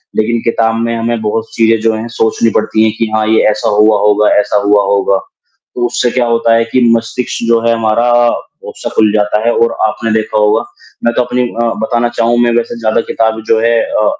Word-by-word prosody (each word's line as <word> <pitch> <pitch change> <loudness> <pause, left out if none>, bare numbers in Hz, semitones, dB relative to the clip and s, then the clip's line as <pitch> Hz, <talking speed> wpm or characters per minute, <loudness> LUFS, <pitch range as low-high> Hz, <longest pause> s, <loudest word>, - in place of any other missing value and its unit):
लेकिन 115 +2 0
किताब 115 -1 0
में 115 0 -2
हमें 115 0 -2
बहुत 110 +1 -2
चीज़ें 115 0 +2
जो 115 0 +1
हैं 110 +2 -5
सोचनी 115 +1 +1
पड़ती 110 0 0
हैं 110 - +2
कि, 115 - -1
"हाँ, 110 0 +1
ये 110 - +3
ऐसा 105 0 -2
हुआ 105 +1 +3
होगा, 105 +1 +2
ऐसा 105 0 0
हुआ 105 0 +3
होगा।" 100 0 +1 0.6
तो 120 - -1
उससे 120 0 -1
क्या 125 0 0
होता 115 0 +1
है 115 0 +2
कि 125 +2 0
मस्तिष्क 115 +1 -4
जो 115 0 +3
है 115 - +3
हमारा 115 +1 0 0.6
अक्सर - - -7
खुल 110 -1 +3
जाता 105 0 +1
है 120 - +4
और 115 0 +1
आपने 115 +1 -3
देखा 110 -1 -1
होगा 105 0 +2 0.4
मैं 120 - +2
तो - - +2
अपनी 125 +1 -2
अ, 115 0 -2
बताना 120 +1 0
चाहूँ 115 +1 +2
मैं 120 - +2
वैसे 120 0 -3
ज़्यादा 110 0 0
किताब 110 0 -1
जो 110 - +2
है 115 +1 +2
अ, 290 +1 -1
115 Hz, 215 wpm, -12 LUFS, 110-115 Hz, 0.6 s, है